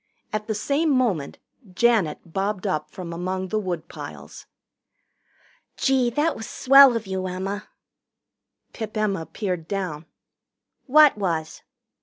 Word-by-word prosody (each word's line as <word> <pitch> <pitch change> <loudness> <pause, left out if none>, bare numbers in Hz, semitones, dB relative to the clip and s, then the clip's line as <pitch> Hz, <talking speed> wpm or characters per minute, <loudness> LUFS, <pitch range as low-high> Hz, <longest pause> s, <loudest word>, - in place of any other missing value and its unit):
At 215 0 -3
the 220 - -1
same 285 +9 0
moment 230 - 0 0.4
Janet 190 -9 +1
bobbed 195 0 -2
up 155 -6 -1
from 175 -2 -7
among 185 +2 -3
the 215 - 0
woodpiles. 175 -5 -7 1.3
"Gee, 265 -3 +2
that 295 +7 0
was 220 - -7
swell 275 -1 +7
of 225 -1 -3
you, 190 -1 -3
Emma!" 195 +3 -4 1.1
Pip 220 -1 -6
Emma 195 -6 -1
peered 180 -6 -4
down. 175 -6 -4 0.8
"What 295 -4 +6
was?" 165 -5 -2
200 Hz, 120 wpm, -24 LUFS, 180-235 Hz, 1.3 s, swell